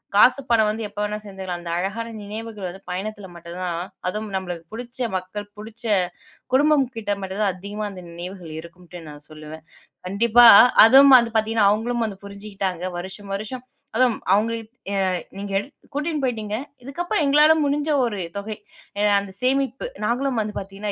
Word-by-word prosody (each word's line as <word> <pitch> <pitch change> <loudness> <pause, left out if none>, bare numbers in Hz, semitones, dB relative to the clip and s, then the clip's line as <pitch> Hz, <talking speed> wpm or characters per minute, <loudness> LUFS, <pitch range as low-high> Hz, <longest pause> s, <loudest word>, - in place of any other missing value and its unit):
காசு 255 +6 +6
பணம் 220 -2 +4
வந்து 220 0 -3
எப்போ 205 - -9
வேணாலும் 210 0 -3
சேத்துக்கலாம் 190 -3 -6
அந்த 170 - -7
அழகான 220 +6 -3
நினைவுகள் 215 -1 -6
வந்து 190 +2 -11
பயணத்துல 205 +2 -5
மட்டும் 170 +1 -9
தான், 175 -1 -2 0.3
அதுவும் 215 +2 -4
நம்மளுக்கு 175 -3 -4
புடிச்ச 245 +2 -8 0.2
மக்கள், 185 +3 -4
புடிச்ச 220 +2 -10 0.7
குடும்பம் 290 0 +4
கிட்ட 205 -2 -1
மட்டும் 190 +2 -4
தான் 195 -2 +1
அதிகமா 205 +3 -5
அந்த 185 -2 -10
நினைவுகள் 175 0 -8
இருக்கும்ட்டு 175 +1 -12
நான் 145 0 -10
சொல்லுவேன். 155 +1 -11 0.4
கண்டிப்பா, 235 +5 +5 0.4
அதுவும் 270 +3 +8
அது 230 -1 -3
பாத்தீங்கன்னா 220 -1 +2
அவுங்களும் 235 +2 0
வந்து 195 -1 -9
புரிஞ்சிகிட்டாங்க. 200 -3 -4
வருஷம், 195 +2 -8
வருஷம் 245 +5 -6 0.3
அதுவும் 250 -2 +3
அவங்க, 215 +3 +3 0.4
ஏ 200 - -2 0.4
நீங்க, 200 0 -6
எடு 205 - -2 0.3
கூட்டின் 300 +1 -2
போய்டீங்க. 220 -4 -2 0.3
இதுக்கப்பறம் 315 +4 -1
எங்களால 300 +2 +6
முடிஞ்ச 290 +2 0 0.2
ஒரு 210 -5 -3 0.2
தொகை, 210 +1 -5 0.4
அ - - 0 0.2
அந்த 200 -1 -7
சேமிப்பு, 270 - 0 0.2
நாங்களும் 250 +1 0
வந்து 210 0 -4
பாத்தீங்கன்னா 195 +2 -5
210 Hz, 160 wpm, -23 LUFS, 190-235 Hz, 0.7 s, அதுவும்